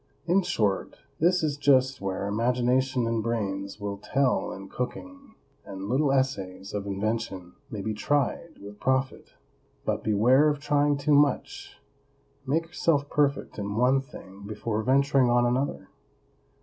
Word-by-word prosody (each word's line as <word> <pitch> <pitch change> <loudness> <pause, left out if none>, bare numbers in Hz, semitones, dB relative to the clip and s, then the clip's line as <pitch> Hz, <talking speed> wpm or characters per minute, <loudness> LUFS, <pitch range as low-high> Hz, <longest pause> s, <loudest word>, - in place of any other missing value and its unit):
In 180 +3 +3
short, 110 - -1 0.2
this 175 +2 +3
is 145 -2 0
just 130 -2 +3
where 95 0 -3
imagination 125 +4 +1
and 115 -1 0
brains 100 -3 -3
will 100 -1 -4
tell 135 +5 0
in 95 +1 -8
cooking, 275 - -7 0.3
and 95 0 -7
little 135 +5 +2
essays 100 -8 -2
of 100 -1 -3
invention 100 -3 -3 0.2
may 105 -7 -5
be 110 +2 -2
tried 145 +7 -1
with 100 +1 -11
profit. 130 0 -1 0.5
But - - -1
beware 125 +8 +4
of 145 - -1
trying 145 0 +2
too 145 +1 +1
much; 145 -2 +1 0.7
make 160 +5 +1
yourself 165 -4 0
perfect 140 -6 0
in 100 0 -3
one 125 +3 +3
thing 100 -8 -13
before 110 +1 -3
venturing 135 +1 +3
on 120 0 +3
another. 125 -5 -1
125 Hz, 140 wpm, -27 LUFS, 105-145 Hz, 0.7 s, beware